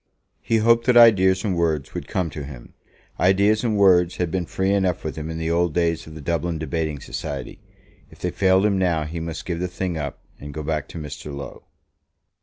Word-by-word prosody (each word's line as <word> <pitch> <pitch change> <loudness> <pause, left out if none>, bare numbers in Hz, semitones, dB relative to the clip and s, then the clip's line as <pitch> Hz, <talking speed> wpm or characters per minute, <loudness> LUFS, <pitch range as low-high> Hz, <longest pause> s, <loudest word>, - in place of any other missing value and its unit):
He 115 - +1
hoped 115 +2 +3
that 125 -1 +5
ideas 95 -5 +6
and 95 -4 0
words 80 -5 -1
would - - -5
come 90 -4 -2
to 75 - -6
him. 65 -4 -11 0.5
Ideas 100 +4 +3
and 110 -3 +1
words 90 -3 +4
had 90 -2 -2
been 90 -2 -2
free 95 +1 0
enough 95 -3 0
with 80 - -4
him 80 0 -5
in 80 - -4
the 80 0 -2
old 85 -2 +1
days 85 -2 0
of 80 - -11
the 80 - -8
Dublin 85 +3 -1
debating 80 -1 -3
society. - - -6 0.5
If - - -16
they - - -3
failed 95 0 +3
him 100 -2 +2
now, 85 -4 +1
he 80 +2 -5
must 80 -1 -5
give 85 -2 -3
the 90 - -1
thing 90 -2 -3
up, 70 -2 -4 0.2
and 70 0 -9
go 75 - -4
back 75 -1 -2
to - - -10
Mr. 75 -1 -7
Low. 70 0 -8
85 Hz, 215 wpm, -23 LUFS, 80-95 Hz, 0.5 s, ideas